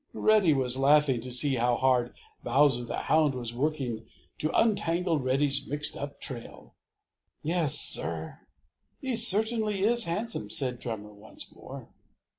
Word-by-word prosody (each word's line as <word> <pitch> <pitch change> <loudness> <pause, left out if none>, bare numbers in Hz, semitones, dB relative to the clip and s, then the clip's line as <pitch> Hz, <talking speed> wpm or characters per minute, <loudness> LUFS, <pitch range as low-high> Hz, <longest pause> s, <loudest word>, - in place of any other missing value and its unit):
Reddy 215 -6 +3
was 130 -3 +1
laughing 140 -3 +3
to 125 +2 -6
see 130 +2 +2
how 120 +1 +1
hard 125 -2 +1 0.3
Bowser 125 -1 +2
the - - -5
Hound 155 -3 +2
was 120 -2 -5
working 125 -5 -3 0.3
to 155 - -1
untangle 175 -6 +1
Reddy's 135 +2 +1
mixed 145 +1 -1
up 140 0 -7
trail. 120 -3 -7 0.7
"Yes, 160 -3 +1
Sir, 80 0 -1 0.6
he 265 -3 -3
certainly 220 -2 +2
is 235 +2 +3
handsome," 175 - -4
said 125 +2 +1
Drummer 105 -3 -7
once 105 +1 -6
more. - - -11
140 Hz, 135 wpm, -28 LUFS, 120-170 Hz, 0.7 s, Reddy